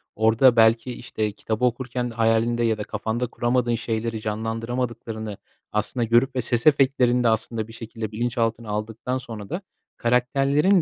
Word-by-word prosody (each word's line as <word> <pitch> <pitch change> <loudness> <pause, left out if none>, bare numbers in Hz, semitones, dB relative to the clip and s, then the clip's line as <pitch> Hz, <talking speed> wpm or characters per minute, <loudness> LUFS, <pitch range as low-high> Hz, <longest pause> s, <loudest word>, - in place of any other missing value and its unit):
orada, 110 +3 +5
belki, 115 +2 +4
işte, 110 -3 -3
kitabı 110 +3 -2
okurken 125 0 -1
hayalinde 115 +1 +2
ya 110 -2 +2
da 105 - -3
kafanda 115 +4 -2
kuramadığın 120 0 0
şeyleri 115 0 -3
canlandıramadıklarını, 110 0 -3 0.3
aslında, 105 +4 -1
görüp 120 +4 +3
ve 125 - +1
ses 120 +2 0
efektlerinde, 130 -4 +4
aslında, 110 0 -1
bir 115 - -12
şekilde 115 -2 -6
bilinçaltına 115 0 -1
aldıktan 110 +4 -3
sonra 115 -5 -8
da 180 - -3 0.4
karakterlerin 135 +9 +3
115 Hz, 140 wpm, -24 LUFS, 110-125 Hz, 0.4 s, orada